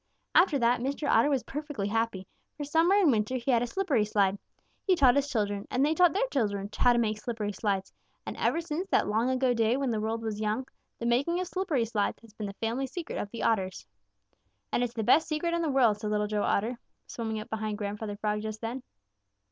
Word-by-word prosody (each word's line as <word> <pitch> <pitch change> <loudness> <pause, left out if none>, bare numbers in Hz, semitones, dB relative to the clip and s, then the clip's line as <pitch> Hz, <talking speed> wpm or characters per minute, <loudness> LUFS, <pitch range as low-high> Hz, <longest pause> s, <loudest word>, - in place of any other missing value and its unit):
After 345 -5 +5
that 240 -1 +2
Mr. 280 +4 -2
Otter 235 +1 +4
was 270 -4 +1
perfectly 295 -8 -4
happy, 225 -3 -1 0.3
for 295 - -4
summer 325 +6 +3
and 385 -8 +5
winter 220 +2 0
he 255 +1 0
had 235 -2 +3
a 245 - -1
slippery 290 - +1
slide. 200 -2 +1 0.4
He 375 - +3
taught 265 -6 +5
his 285 0 +1
children, 205 -5 -1
and 260 +3 +2
they 305 - +2
taught 355 +1 +5
their 410 +6 +1
children 205 -5 -1
how 245 - +4
to - - +1
make 215 -2 0
slippery 220 -3 -3
slides, 195 -2 -2 0.3
and - - -5
ever 330 - +1
since 335 +3 -4
that - - +2
long 220 +4 +1
ago 260 -1 +2
day 230 +1 +2
when 275 -3 0
the 220 - -1
world 225 +1 -2
was 215 -2 -3
young, 215 +4 -1 0.3
the 235 - -5
making 280 +9 +1
of 365 - -1
slippery 335 -10 -1
slides 210 -2 -1
has 225 -2 -17
been 215 -1 -5
the 200 - -6
family 235 +5 -2
secret 335 +5 -5
of 205 - -4
the 235 - -6
Otters." 190 - 0 0.9
"And 245 - +1
it's 245 -1 -3
the 225 - -1
best 305 +9 +4
secret 330 +2 -1
in 340 - +1
the 325 - 0
world," 240 -7 +3
said 210 -1 -3
Little 210 0 +1
Joe 210 0 -1
Otter, 230 +5 0 0.3
swimming 220 -2 -4
up 215 - -9
behind 215 -1 -2
Grandfather 205 0 -4
Frog 210 0 -1
just 215 0 -5
then. 235 +4 -4
235 Hz, 230 wpm, -29 LUFS, 210-280 Hz, 0.9 s, After